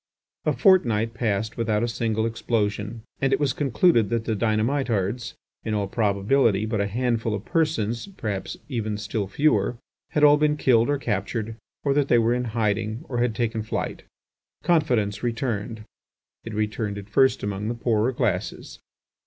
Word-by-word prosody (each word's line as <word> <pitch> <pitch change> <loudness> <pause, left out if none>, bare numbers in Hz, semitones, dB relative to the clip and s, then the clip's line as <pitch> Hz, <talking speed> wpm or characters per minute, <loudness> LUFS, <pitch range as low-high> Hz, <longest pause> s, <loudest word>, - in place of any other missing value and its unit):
A - - +3
fortnight 115 - +3
passed 110 -1 -1
without 110 -2 +1
a - - +1
single 115 -1 -1
explosion, 110 -1 -2 0.2
and 135 0 +2
it 135 - +2
was 145 -2 +1
concluded 135 - +3
that 115 -1 -1
the 110 - 0
dynamitards, 115 0 0 0.3
in 110 -1 -2
all 100 -1 0
probability 105 +1 +2
but 110 -2 -1
a 100 - 0
handful 115 0 0
of 105 - -7
persons, 150 - 0
perhaps 110 - -5
even 110 -6 -2
still 105 -1 -3
fewer, 115 -1 +1 0.4
had 150 - +2
all 145 0 +8
been 150 0 +2
killed 120 -3 +3
or 145 - +2
captured, 110 -1 -2 0.3
or 140 - +2
that 145 -1 +2
they 120 - +4
were 115 +1 +3
in 125 0 -1
hiding, 110 +3 -1
or 120 -2 -2
had 120 -2 +1
taken 115 0 -1
flight. 110 - -3 0.6
Confidence 125 - +1
returned; 115 -2 -2 0.6
it 115 - -7
returned 105 -1 -2
at 100 -1 -8
first 130 +4 +3
among 100 +1 -3
the 120 - -2
poorer 115 0 +1
classes. 110 -7 -2
115 Hz, 160 wpm, -24 LUFS, 105-125 Hz, 0.6 s, all